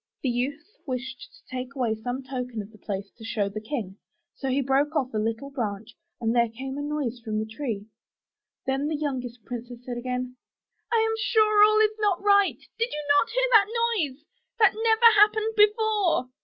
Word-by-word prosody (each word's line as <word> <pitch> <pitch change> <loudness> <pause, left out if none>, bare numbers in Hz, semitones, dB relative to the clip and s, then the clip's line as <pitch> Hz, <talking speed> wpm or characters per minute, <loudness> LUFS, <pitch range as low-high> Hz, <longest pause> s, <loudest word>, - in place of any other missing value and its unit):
The 265 - +1
youth 265 +6 -2 0.2
wished 255 0 -5
to 260 - -13
take 255 +2 -5
away 245 -4 0
some 245 +4 -4
token 250 -3 -5
of 205 - -15
the 215 - -18
place 200 -1 -5
to 225 - -15
show 210 -3 -1
the 215 +2 -6
King, 215 -6 -5 0.4
so 270 - -4
he 260 +2 +1
broke 275 +3 +1
off 265 -5 0
a 215 - 0
little 225 +6 -3
branch 220 -4 -4 0.2
and 230 -1 0
there 235 -1 +3
came 265 +4 -6
a 290 - -4
loud 295 0 -2
noise 240 -1 -4
from 220 -2 -4
the 215 - -1
tree. 220 -3 -4 0.8
Then 270 +2 0
the 310 -1 -1
youngest 250 -6 -4
princess 245 0 -8
said 245 -1 -4
again, 250 0 -4 0.5
*T 460 - +4
am 445 - 0
sure 430 -2 +4
all 430 0 +5
is 430 0 +3
not 410 -4 +2
right 405 -1 +4
— - - -49
did 465 +1 +1 0.2
not 285 0 +4
you - - -8
hear - - +2
that 465 +2 +4
noise? 290 -2 -3 0.3
That 430 -4 +5
never 445 0 +5
happened 435 +1 +4
before.' 420 - +3
265 Hz, 200 wpm, -26 LUFS, -, 0.8 s, all